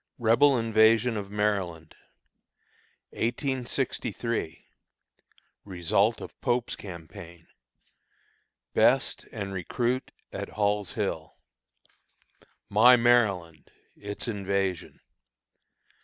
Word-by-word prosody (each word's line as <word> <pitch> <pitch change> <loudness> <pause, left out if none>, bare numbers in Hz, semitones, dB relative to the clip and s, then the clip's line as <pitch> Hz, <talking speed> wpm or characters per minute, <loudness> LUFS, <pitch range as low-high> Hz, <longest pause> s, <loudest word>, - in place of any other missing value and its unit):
REBEL 125 +4 +4
INVASION 115 +1 +3
OF 100 -2 -5
MARYLAND 100 -6 -2 1.2
1863. 120 - -3 1.0
Result 100 +4 +1
of - - -11
Pope's 120 -1 0
Campaign. 85 -2 -11 1.3
Best - - +2
and 100 -1 -5
Recruit 120 +7 -2 0.2
at - - -5
Hall's 105 -2 -1
Hill. - - -4 1.3
"My 120 +5 +7
Maryland:" 100 - +1 0.3
Its 100 +3 -5
Invasion. 100 -4 -2
105 Hz, 70 wpm, -27 LUFS, 95-120 Hz, 1.3 s, My